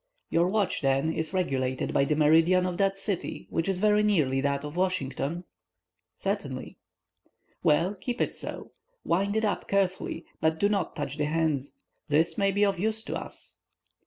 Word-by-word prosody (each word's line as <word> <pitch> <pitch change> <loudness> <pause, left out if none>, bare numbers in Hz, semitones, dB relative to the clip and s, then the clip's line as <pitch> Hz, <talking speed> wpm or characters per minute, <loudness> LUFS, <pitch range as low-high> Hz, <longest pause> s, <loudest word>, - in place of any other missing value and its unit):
"Your 170 +1 +3
watch, 205 0 0
then, 135 +3 +2
is 160 -1 -2
regulated 130 -9 -1
by 140 - +3
the 150 - +1
meridian 165 +4 +4
of 180 -1 -2
that 195 -1 +1
city, 195 -2 -3
which 165 +3 0
is 190 - +1
very 210 +1 +4
nearly 155 -11 +2
that 140 0 0
of 150 +2 -7
Washington?" 175 -3 -1 0.7
"Certainly." 175 -11 -4 0.8
"Well, 170 +6 +3
keep 240 +5 -5
it - - 0
so. - - -6 0.3
Wind 200 +4 +1
it 220 0 +2
up 205 - -1
carefully, 190 -3 0
but 160 0 +1
do 205 - +3
not 200 -2 -1
touch 145 -2 -4
the 150 - +1
hands. 150 -3 0 0.3
This 155 +2 +2
may 195 0 +2
be 205 +1 +3
of 195 -3 0
use 220 +2 -1
to - - -4
us." - - -7
175 Hz, 170 wpm, -28 LUFS, 150-195 Hz, 0.8 s, meridian